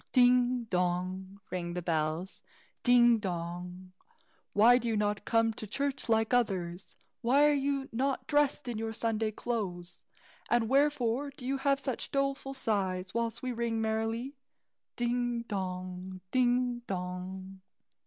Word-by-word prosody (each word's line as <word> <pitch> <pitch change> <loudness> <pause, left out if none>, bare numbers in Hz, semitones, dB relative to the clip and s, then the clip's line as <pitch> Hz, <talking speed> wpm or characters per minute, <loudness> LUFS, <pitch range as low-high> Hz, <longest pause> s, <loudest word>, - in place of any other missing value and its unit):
"Ding, 250 -1 +4
dong!" 185 0 -2
rang 175 -1 -3
the 180 - -2
bells, 160 +2 -1 0.4
"ding, 240 -2 +6
dong! 180 0 -5 0.6
Why 235 +4 +6
do 240 - -4
you 225 -2 +1
not 210 0 0
come 225 -1 +2
to 215 - -7
church 275 +3 -2
like 225 +1 +2
others? 190 -7 0 0.3
Why 270 +5 +5
are 295 - +4
you 275 -1 0
not 260 +2 -1
dressed 290 -1 +2
in 235 -3 -3
your 225 0 -3
Sunday 225 -1 0
clothes, 190 -6 -4 0.5
and 235 -1 +3
wherefore 275 -1 +2
do 265 -2 -10
you 270 +1 -1
heave 275 0 +2
such 265 -3 -3
doleful 275 0 -1
sighs, 195 -6 -1
whilst 230 0 -2
we 255 - -1
ring 235 -1 -1
merrily? 225 +4 -1 0.6
Ding, 240 -1 0
dong! 185 -2 -5
ding, 245 -1 +2
dong!" 185 +1 -5
225 Hz, 135 wpm, -31 LUFS, 185-250 Hz, 0.6 s, ding